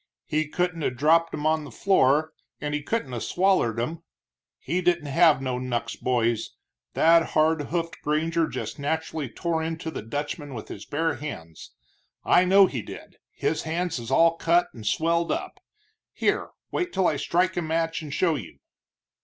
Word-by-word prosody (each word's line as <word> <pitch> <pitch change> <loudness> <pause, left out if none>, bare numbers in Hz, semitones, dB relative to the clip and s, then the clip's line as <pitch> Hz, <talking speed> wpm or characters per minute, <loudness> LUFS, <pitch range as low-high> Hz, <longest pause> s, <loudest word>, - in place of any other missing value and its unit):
He 155 0 0
couldn't 175 +1 -1
'a' - - +1
dropped 160 +6 +3
'em 150 0 -4
on 155 0 +2
the 145 - -9
floor, 155 - +2 0.3
and 150 0 -3
he 150 - -1
couldn't 145 - -2
'a' 120 - -3
swallered 180 - +1
'em. 155 +8 -3 0.6
He 180 +2 -2
didn't 175 -3 +1
have 150 -1 +4
no 125 -1 -2
knucks, 120 -2 -3
boys 120 -3 0 0.4
that 165 +1 +5
hard 155 0 +3
hoofed 165 0 -3
granger 160 +2 +1
just - - -5
naturally 155 -1 -2
tore 165 +7 -2
into 160 0 -4
the - - -5
Dutchman 145 +4 -5
with 110 - -8
his 100 - -8
bare 160 -1 -1
hands. 85 - -8 0.5
I 180 +1 +5
know 195 +2 +7
he 130 -10 -3
did, - - -11
his 145 +3 -1
hands 165 -1 -2
is 115 0 -7
all 165 +4 +4
cut 175 +2 +2
and 110 -4 -8
swelled 165 +7 +1
up - - -4 0.5
here, - - 0 0.2
wait 360 -1 -1
till 190 - +2
I 150 - +1
strike 180 +5 +1
a 175 - 0
match 165 +1 -1
and 150 -2 -8
show 170 +3 +2
you." 120 - -7
160 Hz, 175 wpm, -25 LUFS, 135-170 Hz, 0.6 s, know